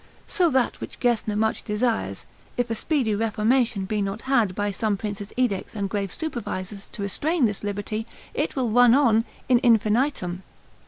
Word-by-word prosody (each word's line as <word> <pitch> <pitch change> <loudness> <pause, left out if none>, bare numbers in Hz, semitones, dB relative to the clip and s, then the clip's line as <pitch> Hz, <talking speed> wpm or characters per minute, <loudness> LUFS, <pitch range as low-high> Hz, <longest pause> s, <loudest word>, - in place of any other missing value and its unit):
So 355 -4 +2
that 260 -4 +1
which - - -7
Gesner 230 -4 +1
much 220 +1 +1
desires, 210 - -1 0.3
if 245 -1 0
a - - +2
speedy 250 -2 0
reformation 225 0 +1
be 210 +1 -1
not 195 +2 -3
had, 235 -8 +2
by 205 0 -1
some 205 +1 -1
prince's 205 -1 -5
edicts 240 -7 0
and 200 -2 -2
grave 200 -2 -2
supervisors, 205 - -5
to 205 - -5
restrain 290 - +1
this 210 -2 -1
liberty, 205 +2 -3 0.3
it - - -1
will 250 -5 0
run 245 +1 +6
on 230 -5 +4 0.2
in 250 -2 +5
infinitum. 220 -5 +2
220 Hz, 165 wpm, -24 LUFS, 205-245 Hz, 0.3 s, run